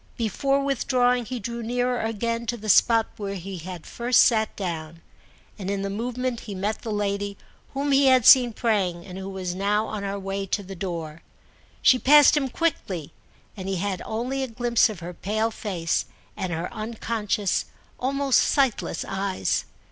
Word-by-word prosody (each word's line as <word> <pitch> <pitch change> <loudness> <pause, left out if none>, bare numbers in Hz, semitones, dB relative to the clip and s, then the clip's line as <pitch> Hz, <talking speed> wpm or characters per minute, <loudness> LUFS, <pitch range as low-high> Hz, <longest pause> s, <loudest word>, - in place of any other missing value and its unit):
Before 275 +5 0
withdrawing 250 -3 +1
he 250 +1 -4
drew 235 +2 -5
nearer 245 +1 0
again 230 +1 -2
to 240 - -1
the 215 -1 -6
spot 225 +3 +5
where 200 -1 -4
he 190 0 -6
had 175 0 -8
first 240 +1 +3
sat 220 -3 +3
down, 165 -3 -5 0.6
and 190 -1 -4
in 200 -1 -1
the 195 - -2
movement 245 +3 -2
he 205 -4 -7
met 205 +3 -2
the 225 - -5
lady 200 -1 -2 0.4
whom 285 +1 0
he 275 0 +5
had 255 -3 +5
seen 250 -2 +8
praying 195 -7 0
and 185 -1 -8
who 190 0 -6
was 185 -2 -4
now 205 +3 +1
on 215 -2 -5
her 200 0 -3
way 195 0 -4
to 200 +2 -1
the 195 +1 -8
door. 165 -4 -5 0.6
She 255 - +6
passed 295 +3 +7
him 275 -3 0
quickly, 195 - -2 0.4
and 190 -2 -6
he 195 - 0
had 190 +1 -2
only 245 +5 -3
a 265 - -1
glimpse 235 0 +2
of 200 -5 -7
her 175 +1 -6
pale 215 +5 -1
face 180 -7 -2 0.3
and 185 - -3
her 170 +5 -4
unconscious, 215 -2 -1 0.3
almost 275 +1 +2
sightless 270 -5 +1
eyes. 195 -1 -1
215 Hz, 175 wpm, -25 LUFS, 195-245 Hz, 0.6 s, seen